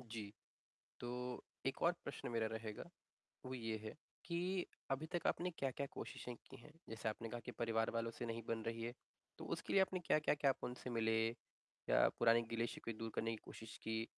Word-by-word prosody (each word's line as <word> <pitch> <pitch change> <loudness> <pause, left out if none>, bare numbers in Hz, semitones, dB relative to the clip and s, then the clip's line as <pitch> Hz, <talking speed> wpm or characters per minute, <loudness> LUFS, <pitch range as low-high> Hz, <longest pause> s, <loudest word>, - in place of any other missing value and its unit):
जी, 110 -4 -5 0.7
तो 125 0 -2 0.2
एक 135 - 0
और 170 - +7
प्रश्न 140 - -3
मेरा 115 -1 +2
रहेगा, 110 -1 -3 0.6
वो 130 - -3
ये 115 -3 -1
है 110 - -4 0.3
कि 180 +2 +1 0.3
अभी 135 +4 +1
तक 175 - +2
आपने 180 +1 +2
क्या-क्या 140 +1 0
कोशिशें 125 - -4
की - - -8
हैं, 150 +6 -13 0.2
जैसे 110 0 -1
आपने 115 +1 -3
कहा 120 - -3
कि - - -3
परिवार 115 -1 +2
वालों 115 0 0
से 120 - -4
नहीं 115 0 -2
बन 115 -1 0
रही 115 0 -1
है, 120 +1 -2 0.4
तो - - -6
उसके - - -1
लिए 195 - +8
आपने 190 -1 +3
क्या-क्या 155 -3 +4
किया? 145 -1 +4
आप 135 - 0
उनसे 125 +1 -3
मिले 115 -2 +3 0.8
या - - +8
पुराने 115 0 +7
गिले-शिकवे 115 0 -1
दूर 115 +1 -3
करने 115 - +2
की 115 - -1
कोशिश 115 0 -8
की? 110 0 0
115 Hz, 195 wpm, -42 LUFS, 115-135 Hz, 0.8 s, लिए